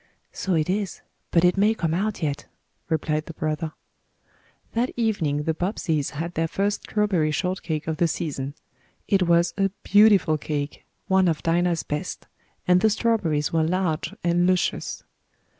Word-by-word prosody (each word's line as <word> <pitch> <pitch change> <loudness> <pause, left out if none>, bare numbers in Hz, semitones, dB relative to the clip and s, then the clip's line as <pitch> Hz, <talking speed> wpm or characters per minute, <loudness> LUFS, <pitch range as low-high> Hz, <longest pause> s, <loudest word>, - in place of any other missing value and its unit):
"So 190 -2 -1
it 155 -1 +1
is. 195 0 -2 0.3
But 170 0 +4
it 180 +2 +3
may 210 +3 +3
come 165 -6 -1
out 200 +1 -1
yet," 145 -2 -2 0.4
replied 155 -1 -1
the 165 - -8
brother. 155 +1 -2 1.0
That 240 +3 +1
evening 165 -11 0
the 160 - 0
Bobbseys 160 -6 -1
had 170 +3 -3
their 165 0 0
first 200 +4 -1
strawberry 195 -7 +1
shortcake 165 -2 -2
of 160 -1 -2
the 170 - +3
season. 145 -4 -3 0.5
It 195 -2 +3
was 170 0 +3
a 195 0 +3
beautiful 200 -7 +5
cake 145 -1 -4 0.2
one 190 -1 +4
of 160 -3 0
Dinah's 170 0 +1
best 150 +5 -4 0.4
and 180 0 +5
the 220 - +5
strawberries 200 -10 0
were 165 - +3
large 165 -1 0
and 175 +1 +2
luscious. 185 -1 0
170 Hz, 155 wpm, -24 LUFS, 155-195 Hz, 1.0 s, beautiful